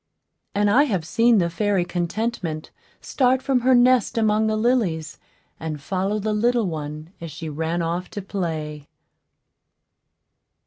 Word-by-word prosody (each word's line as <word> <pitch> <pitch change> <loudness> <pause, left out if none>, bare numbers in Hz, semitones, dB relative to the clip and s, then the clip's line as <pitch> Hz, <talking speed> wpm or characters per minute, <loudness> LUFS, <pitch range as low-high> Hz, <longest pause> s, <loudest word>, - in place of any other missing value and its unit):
And 205 0 +3
I 255 +8 +5
have 190 - -1
seen 230 +5 +3
the 175 -3 +3
fairy 190 +1 0
Contentment 175 -2 -3 0.3
start 260 -1 +2
from 270 -2 +2
her 255 +1 +4
nest 245 0 +4
among 220 -1 +2
the 215 - +1
lilies, 215 - 0 0.4
and 155 -2 -4
follow 190 +7 -1
the 215 +1 -1
little 235 +1 +2
one 155 0 -5
as 165 - -6
she 160 +1 -7
ran 160 +3 -2
off 170 +2 -3
to - - -1
play. 155 -6 -4
195 Hz, 140 wpm, -23 LUFS, 160-230 Hz, 0.4 s, I